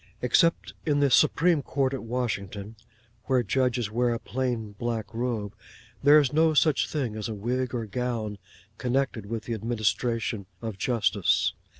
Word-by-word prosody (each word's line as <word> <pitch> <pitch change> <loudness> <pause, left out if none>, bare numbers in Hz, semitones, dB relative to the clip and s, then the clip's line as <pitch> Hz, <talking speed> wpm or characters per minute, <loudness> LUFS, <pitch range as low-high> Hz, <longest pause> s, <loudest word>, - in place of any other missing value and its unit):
Except 165 +7 +2
in 145 -3 +1
the 140 -2 +3
Supreme 155 +3 +4
Court 135 -1 -1
at 135 - -3
Washington 110 -3 -4 0.5
(where 130 -2 +2
the 115 - -9
judges 125 -3 +1
wear 120 +1 +1
a - - -4
plain 120 -4 -3
black 110 -1 -4
robe), 115 -4 -2 0.5
there 145 +2 +7
is 140 -3 +1
no 160 0 +3
such 150 0 +3
thing 130 -8 -2
as 110 0 -4
a 110 - -4
wig 125 +4 -2
or 115 -2 -2
gown 110 -2 -3 0.4
connected 125 -4 -1
with 115 +1 -4
the 120 - -4
administration 110 -1 -1
of 110 -3 -6
justice. 100 -6 +2
120 Hz, 160 wpm, -27 LUFS, 110-130 Hz, 0.5 s, there